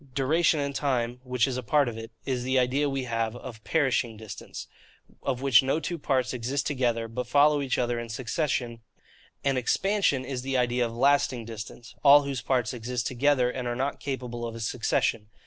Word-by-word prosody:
DURATION, 155 Hz, +4 st, +2 dB
and 140 Hz, 0 st, -2 dB
TIME 125 Hz, -4 st, -1 dB
which 125 Hz, -1 st, 0 dB
is 130 Hz, -2 st, -2 dB
a -, -, -2 dB
part 140 Hz, +4 st, +2 dB
of 120 Hz, -, -3 dB
it, 115 Hz, 0 st, -7 dB, 0.2 s
is 130 Hz, -2 st, -1 dB
the 130 Hz, +1 st, 0 dB
idea 130 Hz, +3 st, +2 dB
we 135 Hz, -1 st, -2 dB
have 115 Hz, -2 st, -2 dB
of 120 Hz, -3 st, -9 dB
PERISHING 130 Hz, -7 st, +1 dB
distance, 110 Hz, -1 st, -8 dB, 0.6 s
of 130 Hz, -1 st, -2 dB
which 135 Hz, -5 st, +6 dB
no 135 Hz, +4 st, 0 dB
two 165 Hz, +2 st, -4 dB
parts 130 Hz, -3 st, 0 dB
exist 130 Hz, +3 st, -2 dB
together, 120 Hz, -5 st, 0 dB
but 120 Hz, +2 st, -4 dB
follow 145 Hz, +2 st, +4 dB
each 135 Hz, -2 st, -1 dB
other 120 Hz, -1 st, 0 dB
in 120 Hz, 0 st, -6 dB
succession; 120 Hz, 0 st, -2 dB, 0.6 s
an 135 Hz, -1 st, +1 dB
EXPANSION 175 Hz, -, +1 dB
is 130 Hz, -3 st, -4 dB
the 135 Hz, 0 st, -1 dB
idea 125 Hz, 0 st, +1 dB
of -, -, -8 dB
LASTING 135 Hz, -3 st, +2 dB
distance, 115 Hz, +1 st, -9 dB
all 145 Hz, 0 st, +8 dB
whose 140 Hz, -3 st, -3 dB
parts 125 Hz, -2 st, 0 dB
exist 120 Hz, 0 st, -3 dB
together 130 Hz, -1 st, +2 dB
and 125 Hz, -1 st, -4 dB
are 120 Hz, -, -1 dB
not 135 Hz, +3 st, -2 dB
capable 125 Hz, -4 st, -4 dB
of 115 Hz, -1 st, -5 dB
succession. 110 Hz, -1 st, 0 dB
125 Hz, 190 wpm, -27 LUFS, 120-140 Hz, 0.6 s, all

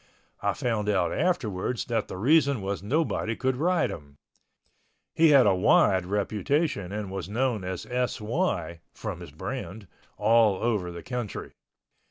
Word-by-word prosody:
I -, -, +1 dB
found 110 Hz, -4 st, -1 dB
out 90 Hz, -5 st, +1 dB
afterwards 125 Hz, -, -1 dB
that 115 Hz, -3 st, -1 dB
the -, -, -7 dB
reason 140 Hz, -, +3 dB
was 100 Hz, -1 st, -3 dB
nobody 120 Hz, -1 st, 0 dB
could 130 Hz, +1 st, 0 dB
ride 175 Hz, +5 st, +1 dB
him. 70 Hz, -3 st, -10 dB, 1.0 s
He 165 Hz, 0 st, +5 dB
had 140 Hz, -4 st, +7 dB
a 100 Hz, -, +5 dB
wide 95 Hz, 0 st, +3 dB
reputation 105 Hz, -, -1 dB
and 105 Hz, -2 st, -4 dB
was 95 Hz, -1 st, -5 dB
known 120 Hz, -2 st, 0 dB
as 90 Hz, -1 st, -4 dB
S.Y. 120 Hz, -, -2 dB, 0.2 s
(from 105 Hz, -6 st, -5 dB
his 85 Hz, -3 st, -9 dB
brand) 105 Hz, -, -6 dB, 0.3 s
all 110 Hz, -1 st, +4 dB
over 100 Hz, -4 st, -1 dB
the 85 Hz, -1 st, -8 dB
country. 120 Hz, -4 st, -5 dB
105 Hz, 145 wpm, -27 LUFS, 95-130 Hz, 1.0 s, had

